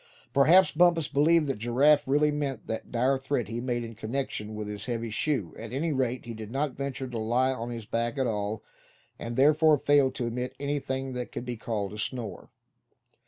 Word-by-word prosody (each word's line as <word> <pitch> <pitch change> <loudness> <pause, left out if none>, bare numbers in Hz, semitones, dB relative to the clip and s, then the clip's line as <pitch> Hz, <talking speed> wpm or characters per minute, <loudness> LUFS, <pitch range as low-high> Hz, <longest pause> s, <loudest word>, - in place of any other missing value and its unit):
Perhaps 170 +7 +6
Bumpus 165 -1 +4
believed 160 +3 +3
that 135 -6 -2
Giraffe 135 +7 +3
really 150 +2 +3
meant 140 -5 -3
that 110 - -5
dire 130 +3 +2
threat 135 -5 -1
he 115 +1 -3
made 120 -1 -1
in 115 0 -7
connection 110 -1 -4
with 105 -1 -5
his 105 -1 -6
heavy 115 -2 -3
shoe; 110 - -1
at 115 0 -7
any 150 +5 -1
rate 130 -2 -1
he 120 - -6
did 110 -1 -8
not 140 +4 -1
venture 140 0 -4
to 120 -2 -4
lie 120 +4 +2
on 120 -2 -4
his 115 -2 -6
back 115 +4 -2
at 135 - +1
all, 105 -1 -2 0.6
and 115 0 -5
therefore 150 +3 +5
failed 140 -1 +3
to 120 - -2
emit 125 +2 -3
anything 135 -2 -2
that 125 -1 -5
could 120 - -5
be 125 -1 -3
called 105 -3 -3
a 105 - -7
snore. 110 -5 -5
125 Hz, 200 wpm, -28 LUFS, 115-140 Hz, 0.6 s, Perhaps